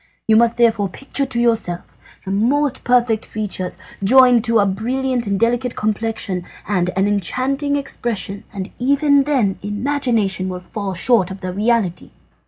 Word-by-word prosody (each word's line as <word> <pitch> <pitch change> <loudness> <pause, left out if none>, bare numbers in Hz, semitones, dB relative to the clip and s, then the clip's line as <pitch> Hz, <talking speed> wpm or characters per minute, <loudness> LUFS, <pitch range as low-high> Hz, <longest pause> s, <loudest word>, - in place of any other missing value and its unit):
You 220 - +4
must 235 +1 +3
therefore 225 -4 +2
picture 275 +6 -2
to 245 -2 -1
yourself 225 -7 +1 0.4
the 190 - -4
most 260 +7 0
perfect 240 -3 +2
features, 190 -4 -4 0.3
joined 250 +1 +6
to 230 -1 +3
a 205 - +4
brilliant 245 +4 -2
and 200 -1 -1
delicate 240 +2 0
complexion, 215 -3 -2 0.2
and 180 -3 0
an 195 +1 +2
enchanting 260 - 0
expression, 230 -7 -3
and 195 -1 -6
even 280 +2 +3
then 245 -10 0
imagination 210 -3 -1
will 180 -1 -5
fall 195 +1 -5
short 195 0 +3
of 190 0 -8
the 185 -1 -4
reality. 210 -3 0
225 Hz, 150 wpm, -19 LUFS, 195-250 Hz, 0.4 s, joined